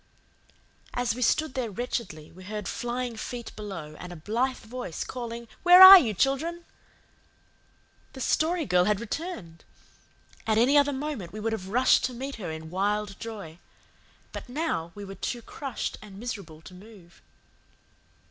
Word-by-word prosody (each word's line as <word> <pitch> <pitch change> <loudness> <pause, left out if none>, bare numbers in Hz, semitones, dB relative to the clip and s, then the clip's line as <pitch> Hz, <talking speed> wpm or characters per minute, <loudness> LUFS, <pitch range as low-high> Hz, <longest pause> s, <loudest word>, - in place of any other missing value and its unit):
As 245 -1 0
we 250 - -7
stood 310 +3 +1
there 250 -3 -2
wretchedly 200 -8 -5
we 185 +2 -14
heard 210 -1 -5
flying 240 0 -3
feet 235 +2 -7
below 190 -8 -7
and 180 - -8
a - - -8
blithe 235 +10 -1
voice 225 -7 -6
calling, 235 -2 -6
"Where 355 +1 +8
are 380 0 +13
you, 225 - -1
children?" 325 - 0 1.5
The 265 - -10
Story 325 +5 +1
Girl 180 -1 +3
had 210 -1 +1
returned! 230 - -6 0.8
At 220 -1 +2
any 250 +6 +4
other 285 0 +5
moment 270 - -5
we 215 - -7
would 225 +1 -2
have 190 -4 -5
rushed 250 +5 +4
to 250 - -4
meet 270 +2 -6
her 185 -6 -5
in 160 0 -7
wild 205 +2 -1
joy. 200 -8 -8 0.7
But - - -8
now 250 - -2
we 205 0 -8
were 195 - -8
too 235 +5 -4
crushed 270 0 -5
and 205 -3 -12
miserable 200 -9 -7
to 170 - -12
move. 185 -2 -16
225 Hz, 155 wpm, -27 LUFS, 190-255 Hz, 1.5 s, are